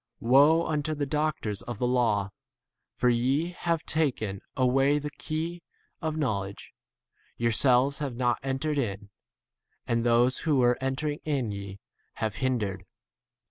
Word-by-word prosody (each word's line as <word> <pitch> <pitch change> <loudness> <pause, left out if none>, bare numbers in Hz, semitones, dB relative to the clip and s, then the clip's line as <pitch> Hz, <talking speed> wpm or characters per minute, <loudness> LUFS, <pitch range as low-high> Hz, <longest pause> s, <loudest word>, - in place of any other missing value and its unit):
Woe 145 +7 +5
unto 155 0 -1
you, - - -4
the 145 -1 -1
doctors 150 -9 -1
of 120 +3 -6
the 125 - -1
law, 115 -5 +1 0.6
for 125 - +1
ye 130 +7 +2
have 170 -2 -2
taken 120 -11 0 0.2
away 135 +3 +3
the 150 0 -4
key 165 +3 -4 0.4
of 160 -1 -2
knowledge; 100 -9 -3 0.6
yourselves 125 +4 +3
have 140 -5 -3
not 120 -1 +1
entered 135 +3 -1
in, 100 -4 -3 0.7
and 115 0 0
those 120 +2 +3
who 155 -3 +1
were 125 -1 +4
entering 140 +3 -2
in 135 -8 -1
ye 100 -1 -7 0.4
have 110 -2 -3
hindered. 105 -8 -1
130 Hz, 140 wpm, -28 LUFS, 115-150 Hz, 0.7 s, Woe